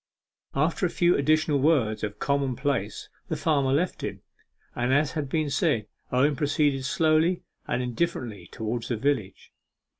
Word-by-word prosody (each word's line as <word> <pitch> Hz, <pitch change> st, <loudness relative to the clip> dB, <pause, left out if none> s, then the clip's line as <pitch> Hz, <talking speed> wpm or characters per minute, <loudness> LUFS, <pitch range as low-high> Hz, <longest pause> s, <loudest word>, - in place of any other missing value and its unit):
After 160 Hz, +6 st, +1 dB
a -, -, -5 dB
few 175 Hz, +1 st, +3 dB
additional 155 Hz, 0 st, +2 dB
words 130 Hz, -8 st, +2 dB
of 105 Hz, -1 st, -3 dB
common 140 Hz, -2 st, 0 dB
place 130 Hz, -7 st, -2 dB, 0.2 s
the -, -, -2 dB
farmer 140 Hz, -4 st, +1 dB
left 165 Hz, +6 st, 0 dB
him, -, -, -5 dB, 0.5 s
and, 120 Hz, +1 st, 0 dB
as 145 Hz, +2 st, +3 dB
has 155 Hz, -3 st, -3 dB
been 155 Hz, +1 st, -1 dB
said, 145 Hz, -6 st, +1 dB, 0.3 s
Owen 140 Hz, +4 st, +3 dB
proceeded 145 Hz, -1 st, +1 dB
slowly 160 Hz, +4 st, +2 dB, 0.2 s
and 125 Hz, -, 0 dB
indifferently 120 Hz, -, -3 dB
towards 115 Hz, +1 st, -3 dB
the 120 Hz, -, -1 dB
village. 115 Hz, -6 st, -2 dB
140 Hz, 150 wpm, -26 LUFS, 125-155 Hz, 0.5 s, few